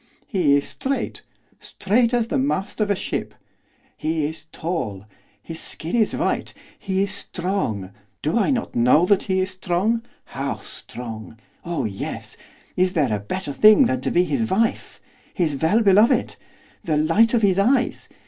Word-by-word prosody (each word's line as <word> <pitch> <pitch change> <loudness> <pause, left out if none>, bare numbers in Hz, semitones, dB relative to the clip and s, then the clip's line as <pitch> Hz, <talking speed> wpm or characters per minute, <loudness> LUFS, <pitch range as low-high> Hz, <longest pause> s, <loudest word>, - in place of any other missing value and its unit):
'He 175 - +2
is 140 - +1
straight, 275 +1 -3 0.4
straight 230 +4 +1
as 235 -2 0
the 280 - +1
mast 215 -6 -1
of 210 - +1
a 200 - +3
ship, - - -4 0.6
he 160 - -1
is 155 +1 -5
tall, 145 - -4 0.4
his 165 -1 -7
skin 165 +6 -3
is 220 -3 +2
white; - - -1 0.2
he 190 -1 0
is 200 - -3
strong 175 - -3 0.3
do 155 - 0
I 230 +2 +2
not 255 -4 -1
know 125 +8 +4
that 200 0 +3
he 190 -2 0
is 190 +1 -2
strong 190 +5 0 0.2
how - - -3
strong! 115 -2 -9 0.3
oh 165 -7 -2
yes! 100 -3 -5 0.4
Is 185 0 +2
there 140 -9 +1
a - - -3
better 145 - -4
thing 215 - +7
than 255 +1 0
to - - -1
be 175 - +3
his 225 +4 -1
wife? 225 +4 0 0.4
his 165 -7 0
well 175 +10 +2
beloved? 210 +2 +4 0.5
the 155 -3 0
light 225 +10 +3
of 225 - +1
his 195 -1 +3
eyes? 250 +5 +1
185 Hz, 165 wpm, -22 LUFS, 155-220 Hz, 0.6 s, thing